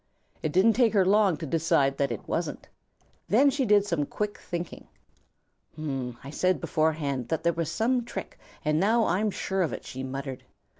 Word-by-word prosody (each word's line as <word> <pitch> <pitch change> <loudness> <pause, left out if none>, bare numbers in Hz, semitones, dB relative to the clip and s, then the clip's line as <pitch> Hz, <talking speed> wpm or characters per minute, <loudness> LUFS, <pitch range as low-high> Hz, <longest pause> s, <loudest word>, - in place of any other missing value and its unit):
It 155 - -1
didn't 195 +7 +5
take 235 -2 +3
her 195 -3 +4
long 195 -3 +4
to 160 - -5
decide 140 -3 +1
that 140 -3 +1
it 115 - -6
wasn't. - - -3 0.6
Then 275 +7 +5
she 270 -1 0
did 205 -1 +5
some 165 -7 -1
quick 210 0 -3
thinking. 175 -1 -6 0.9
"I 135 -3 -5
said 185 0 +1
beforehand 145 -5 0
that 160 - -2
there 170 0 +3
was 165 -1 -2
some 245 +2 +1
trick, 235 - -7 0.3
and 150 +1 +2
now 220 +4 +3
I'm 200 +5 +1
sure 190 -1 -2
of 160 -8 0
it," - - -7
she 130 - -6
muttered. 135 -1 -5
165 Hz, 180 wpm, -27 LUFS, 140-205 Hz, 0.9 s, didn't